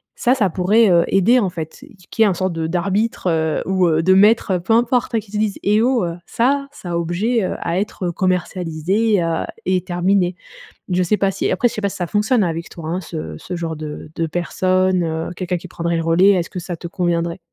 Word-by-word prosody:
Ça, 250 +2 +2
ça 210 -7 +2
pourrait, 205 +5 +3
heu, 170 -1 +5
aider 220 +7 +4
en 195 -6 0
fait, 160 -2 -7 0.3
qu'il 225 - -2
y - - +9
ait 210 - +4
un 185 - -1
sorte 185 0 -1
de 165 -1 -2
d'arbitre, 190 +4 -1
heu, 160 -1 0
ou, 185 -2 +2
heu, 160 0 +2
de 190 - +5
maître, 210 +2 +4
heu, 180 - +1
peu 225 +6 0
importe, 240 0 +2
hein, 225 - +3
qui 200 -1 -13
te 210 - -3
dise: 210 -2 0
«Eh 210 +2 +3
oh! 245 -4 +2
Heu, 170 -1 -4
ça 275 +4 +1
ça 180 -10 -8
a 170 - 0
objet, 195 +8 0
heu, 185 - -2
à 170 +2 -1
être, 200 -2 -4
heu, 175 - 0
commercialisé, 185 +2 0
heu 165 -1 -1 0.2
et 185 0 +1
terminé». 180 +1 +1 0.5
Je 180 0 +1
sais 195 +4 +1
pas 195 - +2
si 195 - -2
après 245 - +2
je - - -9
sais - - -3
pas 200 - +1
si - - -8
ça 175 - -2
fonctionne 210 +5 +1
avec 170 -2 -3
toi, 160 -2 -8
hein, 175 +3 -2
ce 160 -1 -6
ce 180 - -7
genre 165 -2 -4
de 155 0 -7
de 165 - 0
personne, 185 +2 +1
heu, 160 0 -3
quelqu'un 180 -1 -2
qui 185 - -11
prendrait 170 0 -2
le 165 - -1
relais, 170 +4 +5
est-ce 180 -4 +1
que 185 - -6
ça 175 0 -5
te 170 - -7
conviendrait? 170 -1 -1
185 Hz, 245 wpm, -19 LUFS, 170-205 Hz, 0.5 s, y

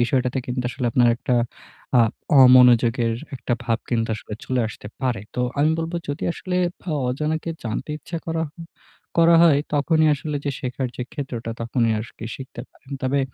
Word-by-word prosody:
বিষয়টাতে 125 +1 +1
কিন্তু 125 0 -2
আসলে 125 -2 -3
আপনার 120 -1 +4
একটা 125 - -1 0.6
আ - - +8 0.4
অমনোযোগের 120 -2 +6 0.2
একটা 125 - -3
ভাব 115 -1 +1
কিন্তু 115 -1 +1
আসলে 105 - -8
চলে 130 -1 0
আসতে 105 - -10
পারে। 125 -6 0
তো 125 - -1 0.2
আমি 155 +2 +4
বলবো 165 +1 -2
যদি 145 - -4
আসলে 180 0 -4 0.2
পা - - -11 0.2
অজানাকে 155 +5 -2
জানতে 110 +6 -3
ইচ্ছা 165 +3 -6
করা 165 0 -1
হ - - -44 0.7
করা 165 0 +7
হয়, 155 -4 +6 0.2
তখনই 155 +2 +3
আসলে 145 +1 -4
যে, 140 - 0
শেখার 130 +1 -3
যে, - - -3
ক্ষেত্রটা, 125 -6 -5
তখনই 115 -1 +1
আরকি 110 0 -8
শিখতে 130 -3 -9
পারেন। 135 - -22
তবে 135 +2 +1
130 Hz, 170 wpm, -23 LUFS, 120-150 Hz, 0.7 s, আ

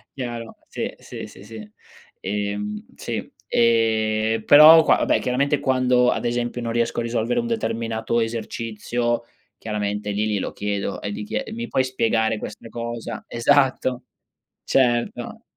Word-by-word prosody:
Chiaro, 120 -3 -6
sì, - - -4
sì, - - -8
sì, 95 - -14
sì. 105 -1 -10 0.5
Ehm, 105 +1 -3
sì. - - -5 0.2
Eh, 110 -1 +2
però 155 +2 +9
qua - - +4
vabbè, - - +2
chiaramente, 140 +3 +1
quando 125 -1 +3
ad - - -1
esempio 120 0 -2
non 115 -1 -3
riesco 120 0 0
a - - -1
risolvere 115 - 0
un 235 - -2
determinato 115 - -1
esercizio 115 +1 -2 0.3
chiaramente 105 -1 -3
lì 105 +2 0
glielo 105 -3 -2
chiedo 100 -1 -3
e 100 - -4
gli 105 - -5
chie 265 - -3
"Mi 235 +1 -5
puoi 130 - +2
spiegare 115 -3 +1
questa 105 +2 -8
cosa?" 120 -1 -5
Esatto. 130 0 +2 0.6
Certo. 120 -3 0
115 Hz, 140 wpm, -23 LUFS, 110-125 Hz, 0.6 s, però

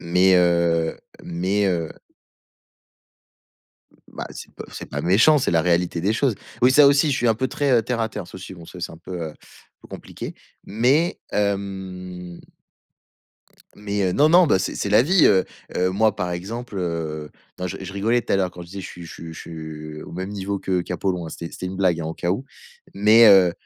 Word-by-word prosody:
Mais 90 +2 +3
heu, 85 -2 +2 0.2
mais, 95 +4 0
heu 85 -4 0 2.0
Mmh, - - -26
bah - - -7
c'est - - -10
pas - - -8
c'est - - -7
pas - - -3
méchant, 115 - +5
c'est - - 0
la 80 -1 +3
réalité 85 -1 +1
des 100 +5 +1
choses. 120 0 +1 0.3
Oui, 125 - +6
ça 145 +1 +7
aussi, 140 +2 +4
je 130 - +1
suis 120 - +1
un 110 - +4
peu, 130 - -3
heu, - - -10
très 130 -5 +2
terre 120 0 -2
à 115 - 0
terre, 90 - -7
ça - - -15
aussi 95 0 -9
bon 85 - -12
ça 90 - -11
c'est 85 - -4
un - - -11
peu, 90 +1 -7
heu, - - -16 0.5
peu - - -17
compliqué, - - -8 0.3
mais 130 - +1
hem 95 -3 -3 1.3
mais 105 0 -3
heu, 90 - +1
non, 150 +8 +4
non, 175 +1 +6
ben 95 - +3
c'est 95 - -2
c'est 100 - -2
la 105 +3 +5
vie, 180 +4 +5
heu, 95 -2 +4 0.3
heu, 90 +1 +2
moi, 105 +2 +2
par 90 -4 -3
exemple, 105 +5 -6
heu, 80 -4 -3 0.3
non 90 - -3
je 95 +2 -5
je 95 0 -7
rigolais 115 +5 +1
tout - - -3
à - - +4
l'heure 95 -2 0
quand 90 0 -10
je - - -11
disais: 100 +1 -7
«Je - - -7
suis 85 - -10
je - - -10
suis 80 -1 -9
je - - -9
suis 75 -1 -8
au - - -11
même 95 +2 -4
niveau 100 0 -3
que 95 -2 -1
qu'Apollon». 90 -1 -3
C'était 85 +1 -7
c'était 90 - -6
une 95 +1 -5
blague 90 -3 +2
au 80 0 -4
cas 85 - -2
où, 125 +8 -2 0.5
mais 110 +3 +6
heu, 95 -4 +7
95 Hz, 215 wpm, -22 LUFS, 85-110 Hz, 2.0 s, ça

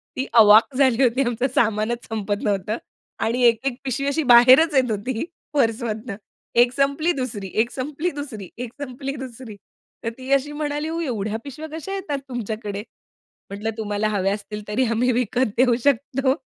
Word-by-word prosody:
ती 260 - -2
अवाक 220 +3 +7
झाली 260 -2 +3
होती. 250 +1 +3
आमचं 240 +1 0
सामानच 225 +1 +1
संपत 205 -2 -2
नव्हतं. 205 0 -1 0.4
आणि 235 +3 0
एक-एक 240 +3 +1
पिशवी 270 +1 -2
अशी 280 +3 0
बाहेरच 255 +7 +7
येत 255 -3 +3
होती 220 +3 -2 0.3
पर्समधनं. 230 -4 -1 0.4
एक 240 +1 +5
संपली, 280 +5 +1
दुसरी. 235 - -4
एक 235 - -1
संपली, 295 +6 -3
दुसरी. 265 - -7
एक 245 -1 -5
संपली, 275 0 -5
दुसरी. 255 -4 -8 0.5
तर 230 - -1
ती 260 +1 -7
अशी 275 +2 +1
म्हणाली, 295 0 -3
"हो, 330 +1 -3
एवढ्या 220 -7 -2
पिशव्या 295 +3 -8
कशा 390 +5 -6
येतात 365 -8 -3
तुमच्याकडे?" 215 -4 -4 0.7
म्हटलं, 205 +2 -4
"तुम्हाला 210 -1 -1
हव्या 195 -2 0
असतील, 210 0 -6
तरी 240 +5 +1
आम्ही 245 +3 +2
विकत 250 +1 +1
देऊ 250 -1 +4
शकतो." 270 0 +1
245 Hz, 160 wpm, -22 LUFS, 220-275 Hz, 0.7 s, अवाक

